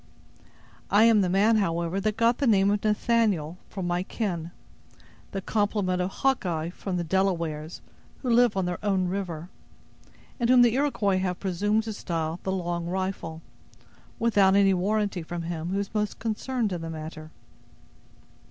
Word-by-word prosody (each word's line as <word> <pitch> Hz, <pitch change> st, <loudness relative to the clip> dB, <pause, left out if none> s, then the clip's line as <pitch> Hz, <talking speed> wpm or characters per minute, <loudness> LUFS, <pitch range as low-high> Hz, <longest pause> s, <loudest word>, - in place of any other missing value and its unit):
I 205 Hz, +2 st, +5 dB
am 225 Hz, -2 st, +6 dB
the 185 Hz, -, +1 dB
man, 210 Hz, +5 st, +4 dB
however, 170 Hz, -1 st, 0 dB
that 215 Hz, +1 st, -1 dB
got 230 Hz, +1 st, +3 dB
the 280 Hz, -, +1 dB
name 200 Hz, -2 st, +4 dB
of 205 Hz, 0 st, -1 dB
Nathaniel 210 Hz, -6 st, +1 dB
from 190 Hz, -3 st, -5 dB
my 175 Hz, 0 st, 0 dB
kin; 180 Hz, -5 st, -3 dB, 0.8 s
the 195 Hz, -1 st, -4 dB
compliment 205 Hz, -4 st, 0 dB
of 180 Hz, -, -1 dB
Hawkeye 175 Hz, -10 st, -1 dB
from 185 Hz, 0 st, -4 dB
the 175 Hz, -, -1 dB
Delawares, 170 Hz, -3 st, -1 dB, 0.4 s
who 250 Hz, -, 0 dB
live 235 Hz, -3 st, +4 dB
on 190 Hz, -, +1 dB
their 175 Hz, +2 st, -4 dB
own 190 Hz, -3 st, +1 dB
river; 180 Hz, -3 st, -4 dB, 0.9 s
and 235 Hz, -1 st, +1 dB
whom 250 Hz, -1 st, +7 dB
the 235 Hz, -2 st, +4 dB
Iroquois 230 Hz, -9 st, +1 dB
have 180 Hz, -1 st, -2 dB
presumed 205 Hz, +4 st, 0 dB
to 220 Hz, -1 st, -4 dB
style 165 Hz, -3 st, -3 dB
the 190 Hz, -, -2 dB
'Long 175 Hz, -2 st, -2 dB
Rifle', 180 Hz, -3 st, -4 dB, 0.7 s
without 205 Hz, -4 st, +4 dB
any 195 Hz, -1 st, +5 dB
warranty 200 Hz, 0 st, 0 dB
from 170 Hz, +1 st, -5 dB
him 165 Hz, 0 st, -4 dB
who 195 Hz, -, -1 dB
is 200 Hz, 0 st, -3 dB
most 210 Hz, -1 st, -1 dB
concerned 225 Hz, -1 st, -2 dB
in 175 Hz, -, -4 dB
the 165 Hz, -, -5 dB
matter." 155 Hz, 0 st, -7 dB
190 Hz, 160 wpm, -26 LUFS, 175-215 Hz, 0.9 s, whom